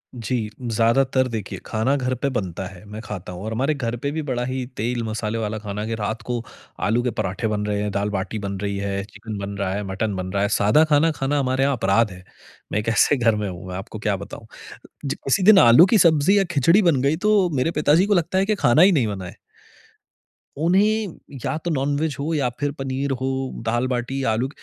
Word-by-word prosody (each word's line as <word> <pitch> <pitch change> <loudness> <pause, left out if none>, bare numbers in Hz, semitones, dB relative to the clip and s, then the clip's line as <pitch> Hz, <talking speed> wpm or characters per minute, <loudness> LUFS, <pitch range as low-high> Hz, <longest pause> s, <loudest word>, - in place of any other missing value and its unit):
जी, 115 -1 -2
ज्यादातर 125 +3 +2
देखिए 110 -5 -5
खाना 115 +5 0
घर 130 -2 -1
पे 140 +3 -1
बनता 95 -8 -3
है, 90 -1 -13
मैं 105 +1 -8
खाता 100 -5 -7
हूँ 90 +1 -8
और 110 - -4
हमारे 135 +7 +1
घर 120 -5 -3
पे 140 +4 -3
भी 160 +2 -3
बड़ा 125 -4 -2
ही 130 0 -3
तेल-मसाले 115 -1 -2
वाला 110 -1 -2
खाना 105 -1 -5
है 110 - -4
कि 115 - -2
रात 110 +1 -3
को 120 +2 -3 0.5
आलू 115 +3 +2
के 125 - 0
पराठे 110 +2 -2
बन 105 -1 -2
रहे 105 -1 -1
हैं, 105 - -1
दाल-बाटी 100 +1 -2
बन 100 -1 -4
रही 100 -1 -2
है, 100 0 -2
चिकन 105 +1 -8
बन 100 0 -5
रहा 95 -1 -1
है, 105 +1 -3
मटन 100 +2 -2
बन 95 0 -4
रहा 100 0 +1
है, 105 - +1
सादा 105 +10 +4
खाना 155 +2 +4
खाना 145 -1 -1
हमारे 130 0 +1
यहाँ 140 0 +2
अपराध 105 +1 +2
है। 90 0 -12 0.5
मैं 105 - +1
एक 105 - -2
ऐसे 115 +6 +3
घर 115 -3 +3
में 105 -1 -2
हूँ, 90 0 -8
मैं 90 - -6
आपको 95 +3 -7
क्या 105 -1 0
बताऊँ, 100 +3 -9 0.6
जि 140 - -1
किसी 135 +8 0
दिन 205 0 +8
आलू 120 +6 +8
की 220 +3 +3
सब्जी 170 +1 +4
या 200 - +4
खिचड़ी 165 +6 +4
बन 165 -9 +3
गई 140 +3 +2
तो 205 -4 +4
मेरे 130 +5 +1
पिताजी 150 +3 +3
को 205 - +2
लगता 175 0 +1
है 190 - +3
कि 215 +1 +1
खाना 150 -6 +4
ही 190 +2 +7
नहीं 135 -10 +2
बना 100 -3 -5
है। 90 - -9 1.2
उन्हें 195 +5 +2 0.3
या 155 - -1
तो 175 - 0
नॉन-वेज 145 +1 -1
हो 155 +4 -2
या 140 -5 +1
फिर 145 -1 0
पनीर 135 +1 -2
हो, 130 - -1 0.4
दाल-बाटी, 120 +3 -1
आलू, 120 +4 -1
120 Hz, 225 wpm, -22 LUFS, 105-145 Hz, 1.2 s, दिन